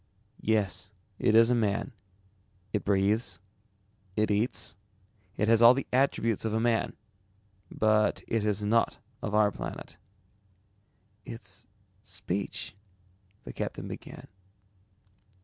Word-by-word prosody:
"Yes, 105 -2 0 0.3
it 110 - +3
is 115 +1 +7
a - - +5
man. 110 -3 0 0.8
It 105 - 0
breathes, 100 -1 +1 0.8
it 110 0 +1
eats, 105 +4 0 0.6
it 105 - +1
has 115 0 +5
all 120 +2 +9
the 135 - -2
attributes 125 -5 +2
of 110 -1 -1
a - - +2
man. 115 0 +1 0.8
But 110 0 +2
it 115 -2 0
is 105 -1 0
not 115 +3 +2 0.2
of 105 - -2
our 105 -1 +4
planet." - - -7 1.3
"Its 100 -4 -8 0.3
speech 95 -1 -4 0.3
..." 95 +2 -36
the - - -7
captain - - -4
began. - - -9
105 Hz, 115 wpm, -29 LUFS, 100-115 Hz, 1.3 s, all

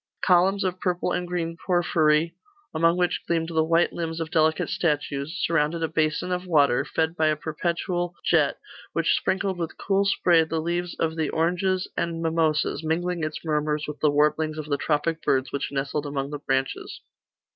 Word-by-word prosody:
Columns 190 +2 +4
of 185 -1 -2
purple 180 -1 -1
and 180 - -2
green 170 -2 -2
porphyry, 165 -3 +2 0.4
among 165 +2 +3
which 180 -1 +1
gleamed 165 -1 0
the 160 -1 +2
white 165 +2 +2
limbs 165 -1 -4
of 160 -1 -4
delicate 160 0 +2
statues, 150 0 -1
surrounded 165 0 +1
a - - +2
basin 155 +3 0
of 180 0 -2
water, 140 -6 +3
fed 160 +3 -1
by 155 -2 +2
a 155 - +2
perpetual 170 +3 -2
jet, - - +3 0.4
which - - +2
sprinkled 190 -1 -1
with 165 -2 -4
cool 195 0 +1
spray 175 -4 +4
the 160 0 -2
leaves 175 +2 -2
of 160 -1 0
the 155 -2 0
oranges 180 +3 0
and 170 -1 -2
mimosas, 160 -1 0
mingling 170 +2 -1
its 155 +2 -4
murmurs 150 -1 0
with 150 0 -6
the 150 - +3
warblings 150 +2 +1
of 155 - -4
the 145 -1 -1
tropic 160 +3 0
birds 130 -1 +1
which 140 - -3
nestled 140 +1 -2
among 140 0 -3
the 145 - -4
branches. 135 -1 -2
160 Hz, 180 wpm, -25 LUFS, 150-175 Hz, 0.4 s, Columns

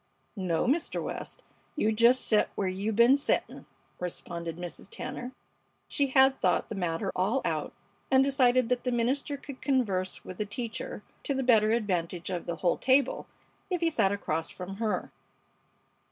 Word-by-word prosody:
"No, 180 -5 0
Mister 305 +7 +1
West, - - -6 0.3
you 220 -8 +2
jest 235 +4 +4
set 215 -2 +3
where 195 - -1
you 195 +4 -2
ben 235 +5 +6
settin'," 280 - -1 0.3
responded 170 -2 -4
Mrs. 175 +2 -7
Tanner. 250 +2 -6 0.6
She 285 -2 +1
had 265 0 +4
thought 180 - +2
the - - -4
matter 180 0 -2
all 200 +8 +1
out - - -1 0.4
and 265 0 +5
decided 255 -3 +3
that 250 -1 0
the 250 - 0
minister 260 +4 0
could 280 -1 -10
converse 200 -9 0
with 185 - -9
the 210 - 0
teacher 230 +2 -5 0.2
to 280 - -1
the 265 - 0
better 220 -4 +4
advantage 180 -7 -1
of 175 -2 -4
the 170 - -2
whole 175 - +3
table 265 +2 +2 0.4
if 360 -2 -1
he 330 -1 +2
sat 205 -9 +2
across 165 -5 -2
from 195 +1 -7
her. 220 -1 -2
225 Hz, 165 wpm, -29 LUFS, 185-260 Hz, 0.6 s, ben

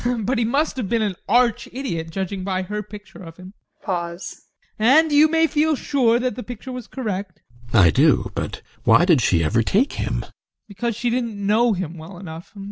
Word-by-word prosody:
But 245 +4 0
he 235 - +1
must 280 +5 0
have 225 -7 -3
been 230 -2 +1
an 200 -3 -1
arch 240 +2 +2
idiot, 170 -12 -4
judging 190 +2 -4
by 185 -1 -1
her 210 +3 -4
picture 205 -1 -12
of 165 -2 -11
him. 185 +1 -12 1.3
And 295 +8 +5
you 295 +2 +6
may 325 +1 +3
feel 310 0 +1
sure 250 -4 +2
that 255 -1 -1
the 250 - -6
picture 245 +1 -8
was 250 -2 -7
correct. 200 -7 -5 0.3
GUSTAV. 115 - +4
I - - +6
do! - - +3
But - - -5 0.2
why 175 - +5
did 165 -8 +4
she 85 -7 +2
ever 110 +9 +2
take 215 - +1
him? - - -2
ADOLPH. - - -16 0.3
Because 225 +3 -3
she 235 +1 -1
didn't 235 -3 -2
know 215 +4 +2
him 175 -3 -5
well 175 +4 -10
enough. 175 +2 -10
215 Hz, 200 wpm, -22 LUFS, 185-250 Hz, 1.3 s, you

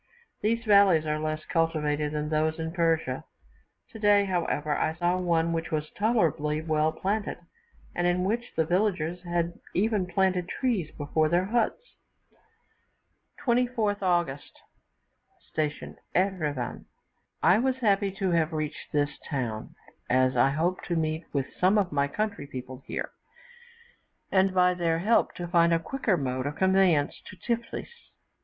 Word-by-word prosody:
These 230 +2 0
valleys 200 -6 +5
are 150 0 -1
less 155 0 -3
cultivated 150 -3 0
than 150 0 -2
those 155 +1 +1
in 160 0 -3
Persia; 165 -2 0 0.7
today, 205 -2 +3
however, 160 -5 -1
I 160 - 0
saw 175 +1 +1
one 170 -2 +1
which 165 0 -2
was 155 -1 -2
tolerably 165 -9 +1
well 155 -1 +1
planted, 205 +5 -2 0.6
and 175 0 0
in 180 +1 +1
which 235 +5 -1
the 160 - +2
villagers 175 -2 0
had 175 -1 -2 0.2
even 205 -1 +1
planted 185 -1 +1
trees 220 - -1
before 155 +1 +1
their 175 +2 +2
huts. 230 +2 +1 1.7
24th 235 -4 +1
August. 175 -7 0 1.0
Station 150 -1 -3 0.2
Erivan. 155 -10 -1 0.6
I 190 - +6
was 260 +1 +1
happy 205 -5 +2
to 195 -2 -1
have 165 -1 +1
reached 155 -1 -4
this 145 -1 0
town, 120 -7 -3 0.3
as 130 +1 +3
I 125 +2 +4
hoped 165 +6 -1
to 175 - -1
meet 160 0 -1
with 140 -2 0
some 190 +4 +4
of 195 -4 +1
my 140 -1 +1
country 205 -3 -3
people 130 -1 -8
here, - - -4 1.2
and, 190 0 +4
by 180 -1 +4
their 170 -2 0
help, 210 +7 +2
to 175 - -5
find 170 -1 +4
a 165 - +4
quicker 215 +1 -1
mode 130 -2 -2
of 145 - -4
conveyance 190 -4 +2
to 185 - -11
Tiflis. 235 - -4
170 Hz, 145 wpm, -27 LUFS, 155-195 Hz, 1.7 s, I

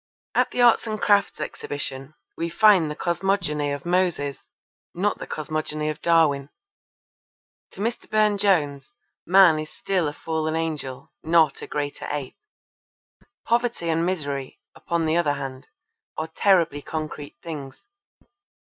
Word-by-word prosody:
At - - +3
the 245 - +1
Arts 235 -1 +5
and 215 -1 -3
Crafts 205 -2 +2
Exhibition 135 0 -5 0.2
we 165 0 -2
find 190 -3 +5
the 150 - -4
cosmogony 170 -5 0
of 140 +1 -5
Moses, 175 -6 0 0.6
not 200 +4 0
the - - -7
cosmogony 155 0 -3
of 155 - -5
Darwin. 155 -5 +3 1.2
To 195 - -8
Mr. 230 +3 -3
Burne 215 -1 +3
Jones 165 -1 +1 0.3
Man 180 -3 +6
is 155 0 -5
still 180 0 -1
a 145 - -3
fallen 160 0 -2
angel, 155 -5 -4
not 160 -3 +3
a - - -7
greater 145 -1 -4
ape. 145 -3 -4 1.1
Poverty 235 -7 0
and 165 +1 +1
misery, 145 -7 -3
upon 170 -1 -2
the 160 +1 +2
other 150 -4 +2
hand, 135 -2 -6 0.5
are 160 +1 -3
terribly 165 -4 +2
concrete 155 -1 -6
things. 145 -5 -8
160 Hz, 135 wpm, -24 LUFS, 145-185 Hz, 1.2 s, Man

